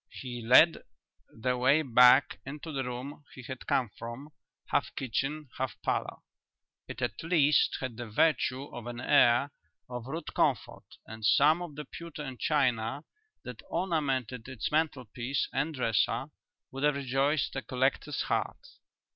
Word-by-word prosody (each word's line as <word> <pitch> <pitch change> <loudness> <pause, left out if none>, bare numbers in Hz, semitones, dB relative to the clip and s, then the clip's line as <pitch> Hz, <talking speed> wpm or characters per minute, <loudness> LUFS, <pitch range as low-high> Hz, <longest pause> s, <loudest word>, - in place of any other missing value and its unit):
He 120 -3 -7
led 130 +8 +6 0.5
the 125 +2 -2
way 140 +5 +4
back 125 +1 +5
into 150 +4 -7
the 135 -2 -2
room 130 +4 -6
he 130 - -10
had 130 +1 -8
come 120 -5 +1
from, 120 +6 -7 0.4
half - - +1
kitchen, 135 +4 -3
half 130 -1 -3
parlour. - - -2 0.7
It - - -6
at 105 - -2
least 155 -3 +3
had 130 -4 -5
the 120 -2 -6
virtue 130 +2 +1
of 120 -1 -7
an 120 0 -6
air 140 0 +4 0.4
of 125 -1 -7
rude 155 +3 -5
comfort, - - 0 0.2
and 110 0 -10
some 155 +9 +4
of 170 -5 -7
the 150 0 -6
pewter 165 0 -8
and 130 -3 -7
china 130 -2 0 0.4
that 125 -3 -8
ornamented 135 - -1
its 130 -5 -4
mantelpiece 130 -4 -1
and 150 +4 -1
dresser 125 +4 0 0.4
would 135 - -6
have 150 0 +3
rejoiced 140 +2 0
a 135 - -2
collector's 135 +3 -1
heart. - - -2
135 Hz, 145 wpm, -30 LUFS, 125-150 Hz, 0.7 s, led